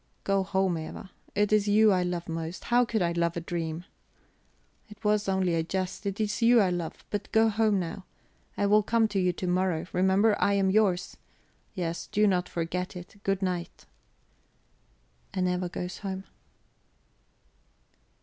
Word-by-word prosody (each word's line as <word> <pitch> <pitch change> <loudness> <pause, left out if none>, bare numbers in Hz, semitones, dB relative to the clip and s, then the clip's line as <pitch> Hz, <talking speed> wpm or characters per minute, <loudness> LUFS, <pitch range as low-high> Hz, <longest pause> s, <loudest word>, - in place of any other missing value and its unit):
"Go 195 0 +2
home, 190 -2 0
Eva. 160 +4 -8 0.2
It 210 0 +2
is 210 -1 +3
you 215 +1 +5
I 185 -2 +3
love 175 -1 -3
most; 165 +1 -5
how 245 +1 +3
could 220 -4 0
I 170 - +1
love 170 0 0
a - - 0
dream? 165 0 -4 1.0
It 210 +1 -14
was 210 -1 +2
only 190 -2 +1
a 165 - +2
jest; 185 +4 -3
it 200 +1 -3
is 215 +2 -1
you 235 +1 +6
I 190 -4 +3
love. 175 -2 -4
But 205 -1 -4
go 220 0 +4
home 215 -2 +2
now; 185 +2 -5 0.5
I 205 - +1
will 210 +1 +5
come 225 +1 +2
to 200 -2 -1
you 180 -1 +2
to 185 - -5
morrow; 180 -2 0
remember, 190 +4 +3
I 200 - +3
am 195 -1 +2
yours; 195 -3 +1 0.6
yes, 170 -3 -3
do 210 +1 +2
not 180 -3 +1
forget 180 +3 -3
it. 180 +2 -10
Good 195 0 -1
night." 180 -2 -3 1.5
And 185 -1 +1
Eva 180 0 -1
goes 180 +1 -5
home. 190 -2 -5
190 Hz, 170 wpm, -28 LUFS, 175-205 Hz, 1.5 s, you